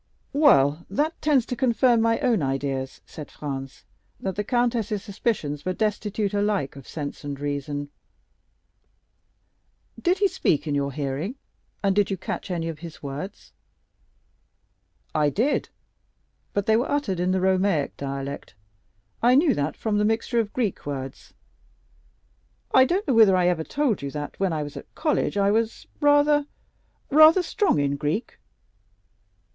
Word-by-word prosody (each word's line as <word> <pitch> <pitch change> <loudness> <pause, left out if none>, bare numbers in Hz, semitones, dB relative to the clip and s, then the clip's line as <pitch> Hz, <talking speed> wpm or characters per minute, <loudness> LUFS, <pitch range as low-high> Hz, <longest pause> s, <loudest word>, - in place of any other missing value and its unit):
"Well, 170 - +4
that 295 - -1
tends 285 -6 +3
to 250 - -4
confirm 240 -1 +3
my 230 0 +2
own 245 - +2
ideas," 135 -1 -2
said 150 -3 -9
Franz, 135 -2 -6 0.4
"that 190 -2 -3
the 210 - -1
countess's 230 -3 0
suspicions 195 -9 -2
were 185 +2 -1
destitute 210 0 -1
alike 205 -9 0
of 135 -2 -12
sense 145 -3 -6
and 140 -1 -5
reason. 145 0 -3 2.1
Did 360 +1 +2
he 400 +1 +3
speak 160 - 0
in 150 - -2
your 140 -1 0
hearing? 145 - -3 0.5
and 195 -1 +2
did 205 -1 +3
you 195 - -2
catch 185 - -5
any 170 -2 -2
of 160 -2 -5
his 165 -2 -10
words?" 145 +9 -7 1.6
"I 150 -1 +3
did; 235 - 0 0.8
but 200 -1 -1
they 220 - +4
were 240 +3 +1
uttered 280 -11 -1
in 180 +1 +1
the 190 - +1
Romaic 185 -5 +1
dialect. 140 -2 -6 0.7
I 245 +2 +5
knew 290 0 +4
that 145 -5 -2
from 210 -2 0
the - - +2
mixture 225 +2 +1
of 215 -2 -1
Greek 225 -7 -2
words. 135 -2 -7 1.4
I 260 - +7
don't 360 +7 -1
know 270 - +2
whether 215 -5 +6
I 180 -1 +3
ever 165 -3 0
told 275 - 0
you 140 - -4
that 145 +1 -6
when 195 -2 +1
I 155 -2 -1
was 145 -1 -8
at - - -11
college 305 -9 0
I 200 0 +3
was 225 +1 -1
rather—rather 295 +2 +3
strong 370 - +1
in 140 0 0
Greek." 155 - -3
195 Hz, 150 wpm, -25 LUFS, 145-240 Hz, 2.1 s, I